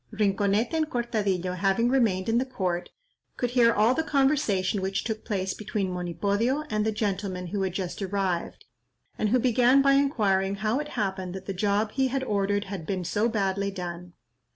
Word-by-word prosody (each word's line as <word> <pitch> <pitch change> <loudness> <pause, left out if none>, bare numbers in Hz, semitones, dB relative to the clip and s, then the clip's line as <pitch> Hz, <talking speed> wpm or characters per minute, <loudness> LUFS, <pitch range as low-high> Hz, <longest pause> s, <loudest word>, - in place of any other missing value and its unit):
Rinconete 205 +3 +1
and 315 -1 0
Cortadillo 205 - -1
having 195 +5 +1
remained 220 -8 +2
in 230 +1 +3
the - - +1
court, 185 -9 -2 0.5
could 245 -1 -1
hear 240 -2 +5
all 220 +3 +3
the 320 - 0
conversation 270 -11 +1
which 190 +1 -1
took 220 -1 -4
place 190 -2 -2
between 205 -3 -3
Monipodio 200 - 0
and 215 0 +1
the 220 - +1
gentleman 195 -3 -2
who 195 +3 -3
had 190 -2 -1
just 185 +1 -4
arrived, 190 -3 -2 0.5
and 215 - +1
who 250 - +4
began 250 +2 +4
by 275 - +5
inquiring 205 -9 +2
how 215 +5 0
it 300 - -4
happened 190 -3 -2
that 190 0 -7
the 195 - -3
job 205 +3 0
he 265 +2 +1
had 265 +1 -2
ordered 205 -3 0
had 195 -5 -7
been 190 -2 -2
so 210 +7 +1
badly 200 -2 0
done. 180 -2 -7
205 Hz, 180 wpm, -27 LUFS, 190-235 Hz, 0.5 s, hear